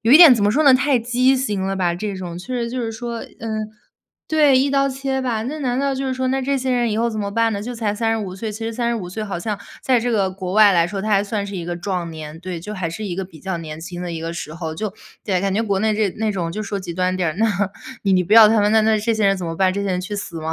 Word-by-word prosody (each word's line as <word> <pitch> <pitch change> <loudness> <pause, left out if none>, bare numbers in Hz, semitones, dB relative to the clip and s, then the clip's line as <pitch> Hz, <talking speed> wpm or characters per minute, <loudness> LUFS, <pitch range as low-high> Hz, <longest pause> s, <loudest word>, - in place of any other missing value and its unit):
有 225 - +1
一 - - +11
点 325 -6 +10
怎 225 - -1
么 205 - +4
说 295 +8 +2
呢， 275 - +8
太 260 +1 +3
畸 250 +3 +2
形 210 -7 -1
了 195 0 -1
吧， 175 -2 +1
这 200 +3 -4
种 175 -2 -6
确 180 - -10
实 235 -1 -2
就 255 +1 -3
是 230 -2 -2
说， 235 +1 -5
嗯， 215 -1 -5 0.6
对， 295 -4 +5
一 275 +2 +2
刀 275 0 +2
切 270 0 -2
吧， 240 -4 -1
那 280 +7 -4
难 250 -2 -1
道 275 0 0
就 270 0 -3
是 260 - -1
说 260 0 -1
那 265 +1 0
这 275 +1 0
些 260 0 -2
人 240 -2 +1
以 210 - -1
后 235 +1 +2
怎 215 -1 -3
么 200 -1 -3
办 230 +2 +1
呢？ 200 0 -3
就 245 +2 -5
才 215 -3 -1
35 220 -3 -1
岁， 215 +3 -4
其 215 +2 -6
实 225 - -3
35 235 -5 -2
岁 215 +4 -4
好 200 -4 -4
像 205 +3 -3 0.2
在 255 -3 +3
这 245 +2 -1
个 200 -5 +1
国 185 -1 -5
外 210 0 +6
来 170 -2 +3
说， 195 +2 -4
他 215 - -3
还 200 -1 +4
算 205 0 -3
是 200 - -7
一 175 -3 -4
个 175 0 -3
壮 180 -1 -3
年， 155 0 -8
对， 180 -1 -5
就 210 +6 -7
还 180 -4 -3
是 190 +6 -6
一 190 -4 -3
个 190 +1 -3
比 180 -3 -14
较 190 +1 -3
年 155 -2 -7
轻 175 +1 -7
的 175 - -4
一 165 -1 -5
个 165 +1 -4
时 160 -3 -6
候。 160 -2 -5
就 210 +3 -4 0.3
对， 190 -4 0
感 195 0 0
觉 225 - +1
国 200 -3 0
内 215 0 +2
这 210 -2 +1
那 220 -1 0
种 175 -4 -2
就 210 - -4
说 200 -1 -4
极 180 -2 -6
端 185 +1 0
点 180 -3 0
儿， 155 - -8
那 225 - +3 0.6
你 195 -2 +2
你 180 -1 +3
不 200 - -3
要 220 -1 +10
他 220 0 +3
们 205 +1 +2
那 220 - +5
那 220 0 +3
这 225 +2 0
些 215 -2 +2
人 195 0 +3
怎 180 -2 -5
么 165 - -3
办？ 185 +1 +2
这 200 +1 -2
些 - - -1
人 180 -1 0
去 205 +3 -5
死 170 -5 -5
吗？ 160 +1 -3
210 Hz, 335 characters per minute, -21 LUFS, 185-235 Hz, 0.6 s, 一